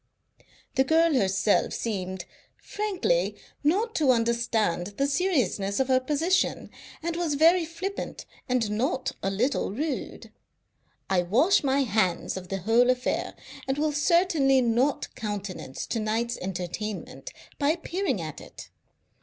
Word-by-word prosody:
The 265 - +6
girl 325 +3 +3
herself 195 -3 +2
seemed, 190 -5 -3 0.3
frankly, 425 +4 -1 0.3
not 410 +10 +1
to 295 -4 +2
understand 230 -6 +1
the 275 - +2
seriousness 275 - 0
of 265 0 +1
her 260 0 +5
position, 310 +8 0 0.3
and 340 0 -2
was 335 -4 0
very 330 +4 +5
flippant 345 +5 -5 0.2
and 240 -4 +1
not 255 +4 -1
a 195 - 0
little 235 +8 0
rude. 290 +7 -4 0.8
I 190 -2 +2
wash 255 - +3
my 275 0 +2
hands 200 -7 0
of 185 -1 -7
the 195 +1 -4
whole 230 +5 +4
affair, 255 0 0 0.3
and 265 +1 0
will 300 0 0
certainly 295 -3 +3
not 250 +3 +1
countenance 200 - -5
to 230 - -2
night's 225 +2 -1
entertainment 205 - -5 0.3
by 285 -1 +2
appearing 350 +4 -1
at - - -7
it. - - -12
255 Hz, 130 wpm, -27 LUFS, 210-320 Hz, 0.8 s, The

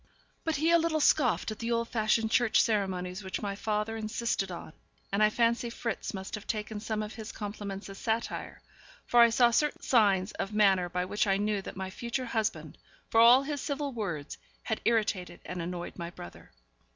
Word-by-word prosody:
But 320 -1 0
he 315 +4 +2
a 340 - +6
little 325 -1 +1
scoffed 245 - +3
at 215 - -7
the 230 +1 -2
old 230 0 +1
fashioned 220 0 +1
church 240 -2 +4
ceremonies 190 -3 0
which 190 +2 -4
my 200 -1 -2
father 210 +2 -2
insisted 220 -3 -2
on; 170 -2 -8 0.4
and 200 +2 +1
I 215 - +6
fancy 235 +2 +1
Fritz 230 0 -4
must 190 -2 -7
have 210 - -6
taken 215 -1 -3
some 215 0 -2
of 210 - -7
his 220 -1 -7
compliments 205 -1 -6
as 195 0 -9
satire, 225 0 -3 0.4
for 240 - +3
I 235 - +8
saw 240 +1 +4
certain 300 +5 +1
signs 200 -6 +3
of 205 +2 -4
manner 190 -4 +4
by 180 +1 -1
which 205 +3 0
I 195 0 +3
knew 205 0 0
that 190 - -9
my 190 0 -4
future 235 +5 -3
husband, 220 -2 -2 0.3
for 225 - +5
all 245 +3 +8
his 285 0 -3
civil 285 -1 -2
words, 175 - -4 0.2
had 220 - -2
irritated 215 -5 0
and 180 -1 -5
annoyed 175 +2 -5
my 170 0 -4
brother. 85 - -11
215 Hz, 195 wpm, -30 LUFS, 195-235 Hz, 0.4 s, I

